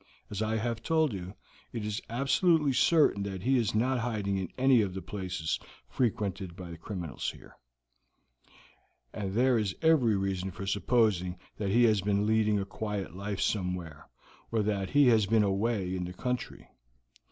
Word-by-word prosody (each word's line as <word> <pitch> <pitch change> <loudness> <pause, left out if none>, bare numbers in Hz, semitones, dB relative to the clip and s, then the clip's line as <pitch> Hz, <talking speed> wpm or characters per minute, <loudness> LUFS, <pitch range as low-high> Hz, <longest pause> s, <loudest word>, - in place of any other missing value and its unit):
As 105 0 -3
I 110 +1 0
have 115 +1 -2
told 160 -2 +1
you, 95 +1 -6 0.4
it 115 -3 -4
is 105 +1 -3
absolutely 140 +4 +2
certain 150 -7 +4
that 95 -2 -4
he 130 +1 +3
is 110 -3 0
not 125 +3 +2
hiding 110 -4 -1
in 95 -2 -3
any 130 -2 +5
of 95 -3 -2
the 95 - -4
places 90 -4 -3 0.3
frequented 100 -7 -2
by 90 -3 -8
criminals 85 -3 -4
here, - - -13 1.6
and 100 -3 -4
there 125 0 +4
is 100 -4 -2
every 130 -10 +4
reason 95 -1 -2
for 95 +1 -7
supposing 100 -3 +1 0.2
that 100 -2 -2
he 120 +5 +4
has 110 -4 +4
been 100 +1 +1
leading 110 -1 +2
a 100 - -1
quiet 100 -3 -4
life 100 +1 -4
somewhere, 90 -6 -2 0.4
or 110 -2 +1
that 100 -2 -1
he 145 -2 +5
has 110 -4 +4
been 110 +1 +4
away 100 -1 0
in 90 -1 -3
the 90 - -6
country. 125 +4 -4
105 Hz, 165 wpm, -30 LUFS, 95-120 Hz, 1.6 s, any